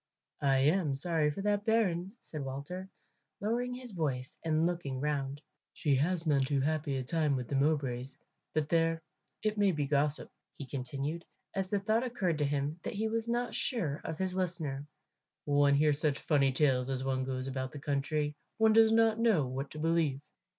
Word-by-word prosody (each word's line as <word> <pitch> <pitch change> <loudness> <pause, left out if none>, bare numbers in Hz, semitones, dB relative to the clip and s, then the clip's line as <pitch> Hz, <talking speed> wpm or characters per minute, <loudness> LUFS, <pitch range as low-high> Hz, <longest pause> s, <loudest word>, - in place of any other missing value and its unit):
"I 135 -1 +3
am 150 0 +3
sorry 155 +1 +1
for 170 +7 -4
that 205 0 +1
bairn," 195 -5 +1
said 150 -3 -6
Walter, 145 +8 -5 0.5
lowering 245 +4 -1
his 250 -2 -7
voice 140 -8 -2
and 160 0 +2
looking 170 -7 -2
round; 145 0 -2 0.3
"she 145 - +1
has 165 +4 +1
none 145 -3 +3
too 140 +1 +1
happy 150 0 0
a 130 - -2
time 150 +1 +1
with 125 -2 -3
the 140 - -2
Mowbrays. 135 -3 0 0.4
But 155 -1 +1
there, 165 -1 +2 0.4
it 215 -1 0
may 200 -2 +5
be 150 -4 -1
gossip," 145 +1 0 0.3
he 140 - -6
continued, 140 +5 -4 0.3
as 190 -1 -1
the 205 - +1
thought 215 +3 +2
occurred 190 -10 -1
to 145 - +2
him 145 +3 -1
that - - -5
he 220 +2 0
was 225 +1 -1
not 240 +1 0
sure 165 - -1
of 160 - -4
his 185 0 -1
listener. 165 -7 -2 0.6
"One 145 -1 +4
hears 150 0 +3
such 150 -3 +1
funny 140 -3 +2
tales 130 -2 +2
as 130 -1 -1
one 130 -1 0
goes 130 0 -3
about 130 -1 -3
the 150 - -8
country; 145 +1 -1 0.2
one 220 -1 +5
does 225 0 +6
not 225 0 +4
know 220 - +3
what 135 +2 -4
to - - -10
believe." 160 -3 +1
150 Hz, 185 wpm, -32 LUFS, 140-185 Hz, 0.6 s, does